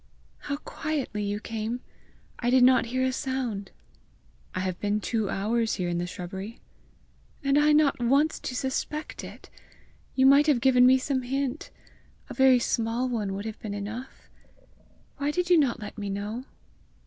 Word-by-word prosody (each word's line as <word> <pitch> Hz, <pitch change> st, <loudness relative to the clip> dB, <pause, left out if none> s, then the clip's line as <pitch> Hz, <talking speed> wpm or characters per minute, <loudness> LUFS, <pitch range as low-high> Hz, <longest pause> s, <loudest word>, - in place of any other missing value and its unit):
"How 285 Hz, -1 st, -4 dB
quietly 295 Hz, -8 st, -3 dB
you 205 Hz, 0 st, -2 dB
came! 225 Hz, +2 st, -4 dB, 0.6 s
I 240 Hz, -, 0 dB
did 255 Hz, 0 st, +5 dB
not 250 Hz, -1 st, +5 dB
hear 255 Hz, +2 st, 0 dB
a 260 Hz, -, +1 dB
sound!" 250 Hz, -7 st, -3 dB, 0.9 s
"I 185 Hz, -, -1 dB
have 185 Hz, -1 st, -3 dB
been 205 Hz, +1 st, 0 dB
two 215 Hz, -1 st, -1 dB
hours 220 Hz, +3 st, 0 dB
here 180 Hz, -2 st, -2 dB
in 175 Hz, 0 st, -1 dB
the 175 Hz, -, -2 dB
shrubbery." 190 Hz, +5 st, -7 dB, 0.8 s
"And 275 Hz, 0 st, +2 dB
I 295 Hz, +1 st, +5 dB
not 300 Hz, -3 st, +4 dB
once 280 Hz, +6 st, +2 dB
to 250 Hz, -, -5 dB
suspect 275 Hz, +4 st, -3 dB
it! -, -, -11 dB, 0.6 s
You 260 Hz, -, +4 dB
might 280 Hz, +3 st, +6 dB
have 285 Hz, -5 st, +4 dB
given 250 Hz, 0 st, +5 dB
me 260 Hz, +1 st, +6 dB
some 260 Hz, 0 st, -1 dB
hint! 270 Hz, +2 st, -3 dB, 0.6 s
A -, -, -5 dB
very 265 Hz, -1 st, +6 dB
small 235 Hz, +1 st, 0 dB
one 210 Hz, -5 st, -2 dB
would 200 Hz, +2 st, -5 dB
have 220 Hz, -1 st, -6 dB
been 205 Hz, -2 st, -5 dB
enough! 220 Hz, +6 st, -7 dB, 0.9 s
Why 285 Hz, 0 st, -1 dB
did 360 Hz, +3 st, -1 dB
you 345 Hz, -, +7 dB
not 270 Hz, -5 st, +1 dB
let 210 Hz, 0 st, -8 dB
me 205 Hz, -1 st, -3 dB
know?" 210 Hz, +5 st, -4 dB
245 Hz, 170 wpm, -27 LUFS, 210-270 Hz, 0.9 s, you